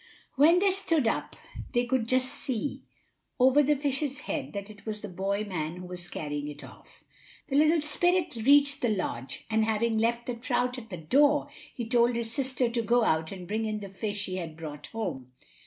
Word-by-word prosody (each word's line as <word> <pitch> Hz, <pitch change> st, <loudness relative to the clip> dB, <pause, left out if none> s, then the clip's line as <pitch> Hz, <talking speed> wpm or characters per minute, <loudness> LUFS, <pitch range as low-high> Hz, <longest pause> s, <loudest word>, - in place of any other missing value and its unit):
When 310 Hz, +6 st, +6 dB
they 390 Hz, +1 st, +4 dB
stood 335 Hz, -7 st, +1 dB
up 225 Hz, -, -1 dB, 0.4 s
they 240 Hz, -1 st, +2 dB
could 240 Hz, -2 st, 0 dB
just 255 Hz, +1 st, +2 dB
see, 260 Hz, +2 st, -3 dB, 0.6 s
over 260 Hz, +3 st, +6 dB
the 295 Hz, +1 st, +3 dB
fish's 280 Hz, 0 st, -1 dB
head, -, -, -4 dB
that 200 Hz, -1 st, -5 dB
it 210 Hz, -1 st, -14 dB
was 215 Hz, -1 st, -4 dB
the 210 Hz, -, -5 dB
boy 195 Hz, +2 st, -2 dB
man 170 Hz, -5 st, -3 dB
who 180 Hz, 0 st, -8 dB
was 180 Hz, -1 st, -3 dB
carrying 145 Hz, -3 st, -4 dB
it 145 Hz, 0 st, -8 dB
off. -, -, -15 dB, 0.5 s
The 275 Hz, -, -1 dB
little 310 Hz, +2 st, +4 dB
spirit 350 Hz, +1 st, +1 dB
reached 280 Hz, +4 st, +4 dB
the 240 Hz, -, +2 dB
lodge, 160 Hz, -, -3 dB
and 220 Hz, 0 st, +2 dB
having 220 Hz, +1 st, +1 dB
left 235 Hz, +1 st, 0 dB
the 245 Hz, -, -2 dB
trout 250 Hz, +2 st, -1 dB
at 225 Hz, -2 st, -13 dB
the 180 Hz, -, -6 dB
door, 285 Hz, -, +3 dB, 0.2 s
he 240 Hz, -, -5 dB
told 240 Hz, 0 st, +3 dB
his 230 Hz, -1 st, -1 dB
sister 260 Hz, -1 st, +1 dB
to 235 Hz, 0 st, -1 dB
go 240 Hz, +1 st, +3 dB
out 160 Hz, -5 st, +1 dB
and 185 Hz, -3 st, -8 dB
bring 220 Hz, +3 st, -1 dB
in 215 Hz, -1 st, -2 dB
the 200 Hz, -1 st, -8 dB
fish 205 Hz, +1 st, -3 dB
he 185 Hz, 0 st, -4 dB
had 165 Hz, -3 st, -6 dB
brought 150 Hz, -3 st, -7 dB
home. 145 Hz, -, -5 dB
230 Hz, 205 wpm, -28 LUFS, 195-265 Hz, 0.6 s, When